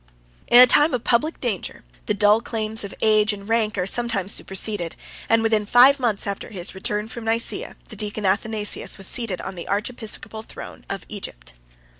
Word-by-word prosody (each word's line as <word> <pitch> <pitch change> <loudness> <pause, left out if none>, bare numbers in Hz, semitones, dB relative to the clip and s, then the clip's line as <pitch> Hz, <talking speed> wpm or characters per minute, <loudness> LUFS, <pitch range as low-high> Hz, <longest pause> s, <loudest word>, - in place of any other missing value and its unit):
In 240 - +7
a 250 - +12
time 295 +3 +5
of 245 - -4
public 300 +7 +1
danger, 225 -7 -4 0.2
the 210 - +1
dull 210 +2 +4
claims 220 -2 -2
of 200 - -6
age 215 -1 +3
and 200 -1 -9
of 200 - -13
rank 220 -2 +1
are 180 - 0
sometimes 205 -2 0
superseded; 190 -3 -1 0.3
and 225 0 +3
within 220 -2 +2
five 250 +6 +6
months 230 -6 0
after 200 -1 -5
his 185 -4 -3
return 210 +2 -3
from 230 +1 -8
Nice, 225 +1 +1
the - - -8
deacon 210 0 -4
Athanasius 210 +2 -1
was 195 - -4
seated 215 -3 -1
on 190 - -6
the 175 -2 -8
archiepiscopal 220 0 -3
throne - - -11
of 195 -2 -5
Egypt. - - -9
215 Hz, 185 wpm, -22 LUFS, 200-230 Hz, 0.3 s, a